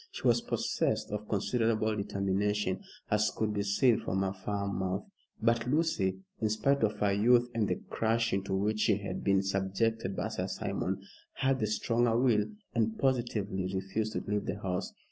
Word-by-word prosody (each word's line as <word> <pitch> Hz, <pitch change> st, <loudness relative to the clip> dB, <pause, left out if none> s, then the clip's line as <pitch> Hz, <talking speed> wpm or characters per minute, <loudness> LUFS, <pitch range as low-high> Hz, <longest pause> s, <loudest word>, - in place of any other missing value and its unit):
She -, -, -9 dB
was -, -, +4 dB
possessed -, -, -1 dB
of 105 Hz, 0 st, -4 dB
considerable 110 Hz, +1 st, +1 dB
determination, 100 Hz, 0 st, 0 dB, 0.3 s
as 105 Hz, 0 st, +3 dB
could 110 Hz, -1 st, 0 dB
be 105 Hz, -, 0 dB
seen 105 Hz, +4 st, +3 dB
from 95 Hz, +1 st, -1 dB
her 95 Hz, 0 st, -1 dB
firm 100 Hz, +1 st, -3 dB
mouth. 95 Hz, +1 st, -2 dB, 0.3 s
But 115 Hz, +1 st, +2 dB
Lucy, 125 Hz, -, +1 dB, 0.2 s
in 110 Hz, -, +1 dB
spite 140 Hz, +7 st, +2 dB
of 110 Hz, -1 st, +1 dB
her 100 Hz, -1 st, +2 dB
youth 120 Hz, +4 st, +4 dB
and 110 Hz, -3 st, +1 dB
the -, -, +1 dB
crushing 115 Hz, -3 st, +1 dB
to 95 Hz, -, -1 dB
which 105 Hz, +3 st, 0 dB
she 105 Hz, -1 st, +3 dB
had 100 Hz, -2 st, -5 dB
been 95 Hz, -1 st, +3 dB
subjected 100 Hz, +2 st, 0 dB
by -, -, -2 dB
Sir -, -, -3 dB
Simon, 95 Hz, +1 st, -2 dB, 0.3 s
had 135 Hz, -1 st, +1 dB
the 110 Hz, -, +1 dB
stronger 115 Hz, +2 st, +2 dB
will, 115 Hz, -5 st, +3 dB, 0.3 s
and 110 Hz, -2 st, +1 dB
positively 105 Hz, -8 st, 0 dB
refused 100 Hz, +3 st, -2 dB
to -, -, -2 dB
leave 105 Hz, 0 st, -1 dB
the 100 Hz, -, -2 dB
house. 90 Hz, -2 st, -2 dB
105 Hz, 175 wpm, -31 LUFS, 100-115 Hz, 0.3 s, was